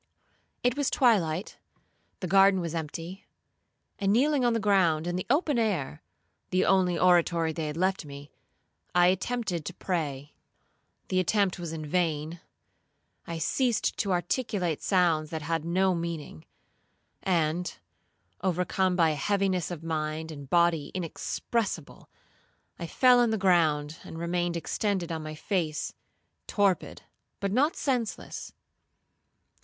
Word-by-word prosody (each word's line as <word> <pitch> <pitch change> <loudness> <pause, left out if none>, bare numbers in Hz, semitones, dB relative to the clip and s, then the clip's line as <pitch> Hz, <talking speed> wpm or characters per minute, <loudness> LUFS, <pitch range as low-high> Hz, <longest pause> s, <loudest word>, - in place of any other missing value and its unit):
'It 245 0 +2
was 285 -2 +1
twilight; 195 - +1 0.6
the 185 - -2
garden 195 +1 +5
was 170 -2 -3
empty; 165 +3 -6 0.7
and 195 -1 +2
kneeling 275 +4 +3
on 240 -1 +3
the 230 - +1
ground, 185 -6 +3
in 175 0 -2
the 180 - -3
open 290 -1 +2
air, 185 - -1 0.5
(the 185 - +2
only 185 -2 +3
oratory 170 -2 +3
they 155 -1 -3
had 150 +1 -5
left 185 +1 +1
me), 140 0 -10 0.6
I 175 0 +6
attempted 190 -2 -1
to 180 - -6
pray. 145 -6 -3 0.8
The 185 - +2
attempt 190 0 +1
was 170 -2 -5
in 160 -1 -5
vain;—I 165 +1 -5
ceased 235 - 0
to 200 - -1
articulate 180 - -1
sounds 170 -5 +2
that 160 -1 -5
had 165 0 -1
no 185 +3 +2
meaning;—and, 170 - -4 0.6
overcome 185 0 +1
by 165 -3 +4
a - - -2
heaviness 195 +2 0
of 170 -3 -6
mind 160 0 -3
and 140 -3 -9
body 170 -3 +3
inexpressible, 185 +1 -3 0.7
I 170 - -4
fell 250 +6 +5
on 240 -1 +4
the 220 - 0
ground, 160 -6 +2
and 165 - -9
remained 170 0 -1
extended 185 0 -2
on 160 -1 -3
my 155 0 -6
face, 160 -2 -2 0.5
torpid, 200 -3 0 0.4
but 200 -1 -2
not 280 +9 +2
senseless. 250 -6 -3
175 Hz, 130 wpm, -28 LUFS, 160-195 Hz, 0.8 s, I